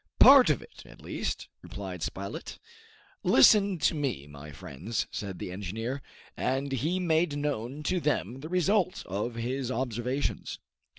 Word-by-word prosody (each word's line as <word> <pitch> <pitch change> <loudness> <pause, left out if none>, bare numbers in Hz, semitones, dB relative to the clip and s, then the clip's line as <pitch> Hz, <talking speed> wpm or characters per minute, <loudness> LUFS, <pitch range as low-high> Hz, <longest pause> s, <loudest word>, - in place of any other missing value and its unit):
"Part - - +9
of - - +1
it, - - -15
at - - -15
least," - - -3
replied 95 -3 -7
Spilett. 100 +4 -5 0.6
"Listen 200 - +6
to 155 - +2
me, 140 - -2
my 75 +1 -11
friends," 80 - -4
said 100 -3 -5
the 90 - -5
engineer. 110 +8 -4 0.3
And 135 +2 -1
he 155 +8 0
made 160 -3 +1
known 145 -1 -3
to 180 +3 +1
them 130 - -1
the 155 +4 -7
result 185 +2 +1
of 105 +5 -3
his 125 +2 -2
observations. 125 +2 -2
130 Hz, 140 wpm, -29 LUFS, 100-150 Hz, 0.6 s, Part